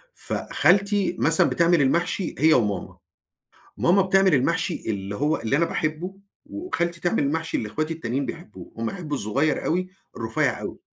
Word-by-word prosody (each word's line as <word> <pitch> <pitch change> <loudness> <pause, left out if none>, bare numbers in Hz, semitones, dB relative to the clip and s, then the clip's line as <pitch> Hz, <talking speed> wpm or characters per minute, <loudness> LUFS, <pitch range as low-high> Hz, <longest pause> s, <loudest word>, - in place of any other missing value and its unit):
فخالتي 200 0 +1
مثلًا 165 +1 +3
بتعمل 170 -2 +3
المحشي 170 +6 0
هي 155 +4 +5
وماما، 105 -5 -1 0.8
ماما 190 +3 +4
بتعمل 190 -1 +3
المحشي 165 +6 0
اللي 100 -2 -3
هو 150 +7 +1
اللي 115 +5 0
أنا 170 - +3
باحبّه 165 +3 -3 0.3
وخالتي 230 - -3
تعمل 175 -4 +1
المحشي 160 +3 -1
اللي 110 - -3
إخواتي 155 +9 -2
التانيين 135 -2 -3
بيحبّوه، 170 +6 -9
هُم 115 - -3
بيحبّوا 155 +1 -4
الصغيّر 135 +8 0
أوي 185 +3 0 0.3
الرفيّع 110 -1 0
أوي. - - -6
165 Hz, 150 wpm, -24 LUFS, 135-180 Hz, 0.8 s, هي